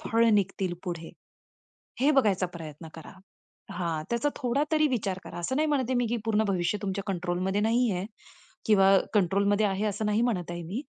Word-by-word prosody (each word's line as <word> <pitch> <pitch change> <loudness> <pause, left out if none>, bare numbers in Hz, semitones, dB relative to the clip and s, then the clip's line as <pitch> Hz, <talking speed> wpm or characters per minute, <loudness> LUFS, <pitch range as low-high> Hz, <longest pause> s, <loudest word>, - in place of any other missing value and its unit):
फळ 230 +1 +2
निघतील 195 -3 0
पुढे? 170 -3 -5 0.9
हे 280 +3 +4
बघायचा 205 -9 +3
प्रयत्न 160 0 -9
करा. 160 +3 -10 0.6
हा 165 -3 -2
त्याचा 235 +5 +1
थोडा 260 +1 0
तरी 310 -1 +4
विचार 205 -8 -1
करा - - -8
असं 175 +10 -2
नाही 310 +2 +2
म्हणत 285 -3 +1
आहे 260 - 0
मी 245 - +1
की 235 +2 -1
पूर्ण 220 -1 +2
भविष्य 185 +1 0
तुमच्या 200 0 -2
कंट्रोलमध्ये 185 +1 -1
नाही 235 +2 +2
आहे 180 0 -2 0.6
किंवा 195 -3 +5 0.2
कंट्रोलमध्ये 200 +2 +2
आहे 195 +1 -1
असं 210 +1 -2
नाही 210 +2 +2
म्हणत 185 -8 -1
आहे 175 0 -5
मी. 200 - -4
200 Hz, 180 wpm, -28 LUFS, 180-230 Hz, 0.9 s, किंवा